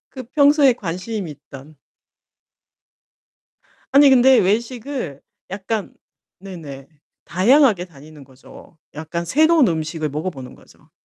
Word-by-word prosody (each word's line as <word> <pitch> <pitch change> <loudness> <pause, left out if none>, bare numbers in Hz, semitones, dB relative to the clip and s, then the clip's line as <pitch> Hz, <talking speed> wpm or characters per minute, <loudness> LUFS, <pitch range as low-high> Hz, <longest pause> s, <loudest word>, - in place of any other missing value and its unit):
그 260 - -9
평소에 285 -2 +4
관심이 185 -1 -6
있던. 140 +1 -15 2.2
아니 280 0 +7
근데 260 0 +5
외식을 230 - -2 0.3
약간 200 +2 -5 0.5
네네 155 -8 -10 0.4
다양하게 205 - +3
다니는 150 -2 -16
거죠. 130 +4 -18 0.2
약간 160 +3 -5
새로운 310 - +3
음식을 160 -1 -3
먹어 155 +6 -4
보는 130 -6 -11
거죠. 150 +1 -23
185 Hz, 235 characters per minute, -19 LUFS, 155-250 Hz, 2.2 s, 아니